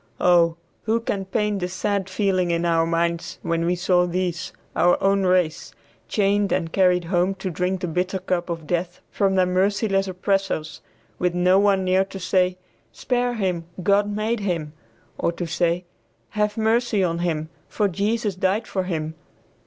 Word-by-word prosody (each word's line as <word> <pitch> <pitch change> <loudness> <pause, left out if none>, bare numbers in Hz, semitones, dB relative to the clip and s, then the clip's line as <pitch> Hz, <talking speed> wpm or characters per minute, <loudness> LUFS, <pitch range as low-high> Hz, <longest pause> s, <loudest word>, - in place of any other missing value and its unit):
Oh! 170 -2 +4 0.3
who 225 +1 +2
can 200 -4 -3
paint 210 +1 -1
the 180 - -2
sad 195 +1 -2
feeling 185 -2 +1
in 170 0 0
our 165 -1 +2
minds 170 0 -1
when 165 -1 0
we 180 - +2
saw 180 0 +2
these, 175 -1 -2 0.2
our 175 +2 +4
own 195 -1 +2
race, 180 -3 0 0.3
chained 205 -1 +1
and 165 -3 -1
carried 180 -2 +3
home 180 +2 +1
to 190 -1 -4
drink 180 +2 -1
the 180 - -2
bitter 180 +3 -1
cup 180 -1 -2
of 165 -2 -4
death 175 +2 -2
from 195 -1 +1
their 185 -1 +4
merciless 195 +2 +1
oppressors, 190 -3 -1 0.4
with 180 -1 0
no 180 +2 +4
one 200 -2 +3
near 185 +1 +3
to 195 0 -9
say, 180 0 +1 0.3
"Spare 245 -1 -1
him, 180 -6 -1 0.2
God 205 +2 +3
made 215 +3 -1
him," 170 -7 -2 0.5
or - - +1
to 175 - -4
say, 175 +1 0 0.4
"Have 210 +1 -1
mercy 225 -2 +2
on 170 -2 0
him, 160 -3 -2 0.2
for 210 - 0
Jesus 205 +3 -1
died 190 +4 0
for 190 -3 -2
him." 160 -3 -3
185 Hz, 170 wpm, -23 LUFS, 175-200 Hz, 0.5 s, Oh